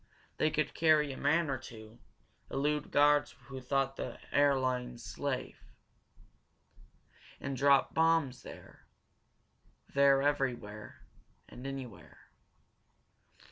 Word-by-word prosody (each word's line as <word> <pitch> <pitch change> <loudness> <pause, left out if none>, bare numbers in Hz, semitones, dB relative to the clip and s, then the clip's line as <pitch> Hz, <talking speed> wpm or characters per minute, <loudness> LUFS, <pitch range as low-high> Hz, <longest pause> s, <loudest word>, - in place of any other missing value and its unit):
They 155 - +2
could 155 0 -1
carry 155 -3 +3
a - - -8
man 160 +4 +1
or 135 -3 -2
two, 110 -2 -12 0.5
elude 150 +2 -1
guards 145 0 +3
who 135 -1 -7
thought 135 +1 -1
the - - -5
air 140 -1 +4
lanes 125 -2 -3
safe, 140 -3 -5 1.6
and 140 -1 -4
drop 140 +1 +3
bombs 160 -5 +2
here, - - -13 1.1
there 140 -1 +4
everywhere 120 -7 -2 0.4
and 125 +2 -9
anywhere. 135 -5 -9
135 Hz, 100 wpm, -32 LUFS, 130-145 Hz, 1.6 s, air